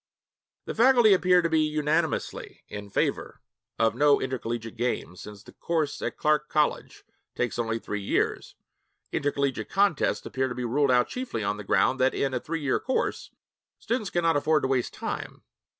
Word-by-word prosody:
The -, -, -4 dB
faculty 240 Hz, -2 st, +6 dB
appear 180 Hz, -1 st, +4 dB
to -, -, +2 dB
be 160 Hz, -1 st, +2 dB
unanimously 155 Hz, +1 st, -1 dB
in 105 Hz, 0 st, -8 dB
favor -, -, -2 dB, 0.4 s
of 115 Hz, 0 st, +2 dB
no 145 Hz, -1 st, +4 dB
intercollegiate 120 Hz, -3 st, -4 dB
games, 120 Hz, -6 st, -3 dB
since 105 Hz, -1 st, -11 dB
the -, -, -14 dB
course 160 Hz, -4 st, -2 dB
at -, -, -3 dB
Clark 150 Hz, 0 st, +1 dB
College 150 Hz, -1 st, -1 dB, 0.3 s
takes 125 Hz, -1 st, -2 dB
only 115 Hz, -1 st, -1 dB
three 105 Hz, -2 st, -5 dB
years. 100 Hz, -, -1 dB, 0.6 s
Intercollegiate 140 Hz, -2 st, -1 dB
contests 195 Hz, -5 st, +1 dB
appear 130 Hz, 0 st, -1 dB
to 125 Hz, -, -5 dB
be 125 Hz, -, -3 dB
ruled 140 Hz, +4 st, +1 dB
out 125 Hz, -1 st, +4 dB
chiefly 250 Hz, -, -4 dB
on 100 Hz, +1 st, -1 dB
the 105 Hz, -, -7 dB
ground 130 Hz, +6 st, +2 dB
that, 130 Hz, +1 st, +2 dB
in 135 Hz, -1 st, -1 dB
a 125 Hz, -, 0 dB
three 165 Hz, +3 st, -4 dB
year 140 Hz, -3 st, +1 dB
course, 260 Hz, -, -2 dB, 0.5 s
students 230 Hz, -4 st, -2 dB
cannot 165 Hz, -2 st, +1 dB
afford 150 Hz, +2 st, +2 dB
to -, -, +2 dB
waste 130 Hz, -2 st, 0 dB
time. -, -, -6 dB
140 Hz, 170 wpm, -26 LUFS, 120-165 Hz, 0.6 s, faculty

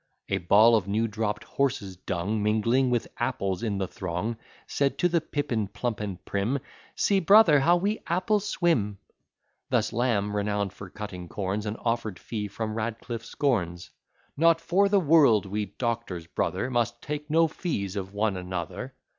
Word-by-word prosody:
A 100 Hz, -, +1 dB
ball 105 Hz, +6 st, +6 dB
of 100 Hz, -4 st, 0 dB
new 110 Hz, +3 st, +1 dB
dropp'd 105 Hz, -1 st, -2 dB
horse's 125 Hz, -9 st, -1 dB
dung, 95 Hz, +4 st, -2 dB
Mingling 115 Hz, +5 st, +2 dB
with 120 Hz, -2 st, 0 dB
apples 100 Hz, -7 st, -1 dB
in 105 Hz, -4 st, -1 dB
the 95 Hz, -1 st, -1 dB
throng, 95 Hz, +6 st, -3 dB, 0.3 s
Said 140 Hz, -1 st, 0 dB
to 180 Hz, -, +3 dB
the 170 Hz, -1 st, +1 dB
pippin 125 Hz, -9 st, -2 dB
plump 120 Hz, +2 st, -3 dB
and 100 Hz, -4 st, -5 dB
prim, 100 Hz, +7 st, 0 dB, 0.4 s
"See, 200 Hz, -1 st, +2 dB
brother, 190 Hz, -5 st, +7 dB
how 170 Hz, +6 st, +4 dB
we 205 Hz, +5 st, -1 dB
apples 190 Hz, +4 st, +1 dB
swim." 120 Hz, -, +1 dB, 0.7 s
Thus -, -, +1 dB
Lamb, 105 Hz, -4 st, 0 dB
renown'd 105 Hz, -1 st, -1 dB
for 100 Hz, -, -10 dB
cutting 90 Hz, -4 st, -7 dB
corns, 100 Hz, +3 st, -3 dB
An 105 Hz, -, -2 dB
offer'd 115 Hz, -5 st, -2 dB
fee 105 Hz, +1 st, -4 dB
from 110 Hz, +1 st, -4 dB
Radcliff 115 Hz, +1 st, -4 dB
scorns, 90 Hz, -, -1 dB, 0.4 s
"Not 165 Hz, +2 st, +4 dB
for 195 Hz, +4 st, +2 dB
the 200 Hz, 0 st, +4 dB
world 145 Hz, -, +5 dB
we 105 Hz, +2 st, -2 dB
doctors, 110 Hz, -5 st, -3 dB
brother, 130 Hz, +8 st, -2 dB
Must 120 Hz, -1 st, 0 dB
take 150 Hz, 0 st, -5 dB
no 165 Hz, +2 st, +4 dB
fees 105 Hz, -, -3 dB
of 95 Hz, -1 st, -4 dB
one 105 Hz, 0 st, 0 dB
another." 90 Hz, -2 st, -5 dB
110 Hz, 165 wpm, -27 LUFS, 100-140 Hz, 0.7 s, brother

